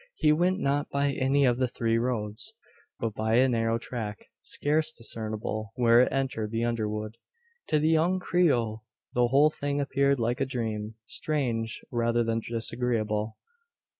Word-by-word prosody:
He 150 - +3
went 180 +4 +2
not 140 +1 0
by 140 0 +1
any 135 +1 +2
of 120 -1 +2
the 130 - +2
three 115 -1 0
roads, 110 -3 -2 0.4
but 115 -2 -2
by 110 +1 0
a 130 +2 +5
narrow 115 -2 +1
track, 110 -3 -5 0.2
scarce 155 +2 0
discernible 110 -4 -3
where 120 -1 +5
it 125 - +2
entered 130 -6 -1
the 115 +1 -1
underwood. 110 -1 -2 0.5
To 155 - +2
the 155 +1 +2
young 165 +4 +3
Creole 120 -13 +1 0.3
the 120 0 +3
whole 140 +5 +5
thing 145 -1 -2
appeared 140 -1 +2
like 120 +3 0
a - - +3
dream 110 -4 -3
strange, 120 -6 -2
rather 115 0 +1
than 115 0 0
disagreeable. 115 -2 -2
120 Hz, 155 wpm, -28 LUFS, 110-140 Hz, 0.5 s, a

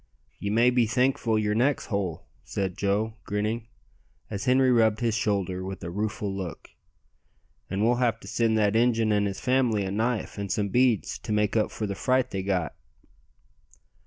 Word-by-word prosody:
"Ye 100 - -3
may 115 +4 +4
be 120 -2 +3
thankful 125 -1 +1
yer 105 -1 +1
neck's 130 +6 +1
whole," 95 -6 -3 0.2
said 95 -2 -3
Joe, 105 +3 -1
grinning, 110 +3 -2 0.6
as 100 0 -4
Henri 130 0 +4
rubbed 110 -3 +3
his 115 -2 +1
shoulder 100 -4 -1
with 95 -1 -6
a 85 - -4
rueful 105 0 -3
look. 95 -4 -7 1.0
"An' 95 +2 -1
we'll 120 +2 +3
have 115 -2 +1
to - - -11
send 115 0 +1
that 105 -1 +2
Injun 115 -2 +3
and 105 -1 +2
his 95 -1 -4
family 125 -3 +2
a 95 - -3
knife 110 +1 -1
and 100 -2 -3
some 100 +1 0
beads 120 -1 +2
to - - -6
make 105 0 +1
up 110 -2 +2
for 110 - -4
the 100 - -3
fright 130 +4 +1
they 95 - -2
got." 95 -6 -1
110 Hz, 180 wpm, -26 LUFS, 100-115 Hz, 1.0 s, may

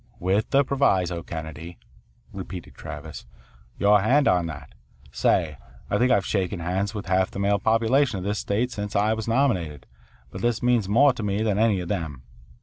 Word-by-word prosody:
"With 95 +5 0
the 140 +1 +4
proviso, 95 -11 +1
Kennedy," 80 +1 -8 0.6
repeated - - -8
Travis. 75 -3 -9 0.5
"Your 105 0 +4
hand 135 +7 +3
on 90 -2 +2
that. 75 -4 -9 0.4
Say, 75 -5 +1 0.3
I - - +2
think 125 +1 +3
I've 95 - +3
shaken 95 -2 -1
hands 95 +5 -2
with 105 - -5
half 95 0 +1
the - - -9
male 100 +1 +1
population 115 +3 +2
of 90 - -5
this 105 +1 -2
state 115 +5 -1
since 105 -2 -5
I 105 +2 +2
was 110 0 -5
nominated, 95 - 0 0.5
but 95 - -7
this 120 +1 0
means 120 -5 +2
more 135 +6 +5
to 120 - -7
me 105 +1 -1
than 105 -2 0
any 110 -4 +2
of 90 - -6
them. 80 -9 -4
100 Hz, 180 wpm, -24 LUFS, 90-115 Hz, 0.6 s, more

